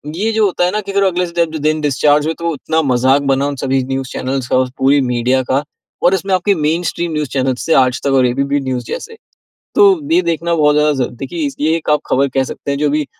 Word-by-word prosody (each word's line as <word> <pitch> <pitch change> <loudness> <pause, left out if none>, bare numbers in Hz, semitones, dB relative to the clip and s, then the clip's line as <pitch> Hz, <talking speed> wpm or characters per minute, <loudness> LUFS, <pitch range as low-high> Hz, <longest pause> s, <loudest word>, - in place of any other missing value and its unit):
ये 215 +6 -1
जो 220 -1 +2
होता 180 -2 +1
है 180 - 0
ना 210 - -1
कि 200 - -7
अगर 200 0 +1
अगले 180 -1 +1
इस 170 - -9
डेबड 165 -2 0
दिन 155 0 +1
डिस्चार्ज 145 +1 +2
हुए, 160 - -1
तो 170 - -5
वो 170 - 0
इतना 160 +3 -1
मजाक 130 +3 +3
बना 135 +1 0
उन 145 - -3
सभी 135 0 0
न्यूज़ 135 0 -3
चैनल्स 130 -1 -3
का 130 - +3 0.2
पूरी 140 +2 +4
मीडिया 125 +1 +1
का 135 +2 +1 0.4
और 175 - +4
इसमें 190 +1 -2
आपके 195 +2 +1
मेनस्ट्रीम 165 +2 -1
न्यूज़ 150 -4 -2
चैनल्स 130 0 -2
थे - - +5
आज 125 +1 -3
तक 140 - +2
और - - +3
ए 120 - -1
बी 140 +2 0
पी 145 - +1
न्यूज़ 125 -2 -3
जैसे। 450 - -7 0.6
तो - - +6 0.3
ये 355 - +4
देखना 170 +1 -1
बहुत 150 -2 +3
ज़्यादा 150 0 +3
ज़ - - -5
देखिए 320 - -3 0.2
ये 160 +1 +2
एक 165 - -4
आप 150 - +3
खबर 140 +1 +1
कह 130 +1 0
सकते 140 - -6
हैं, 140 - -1
जो 150 - +1
अभी 150 -1 -1
150 Hz, 260 wpm, -16 LUFS, 135-170 Hz, 0.6 s, तो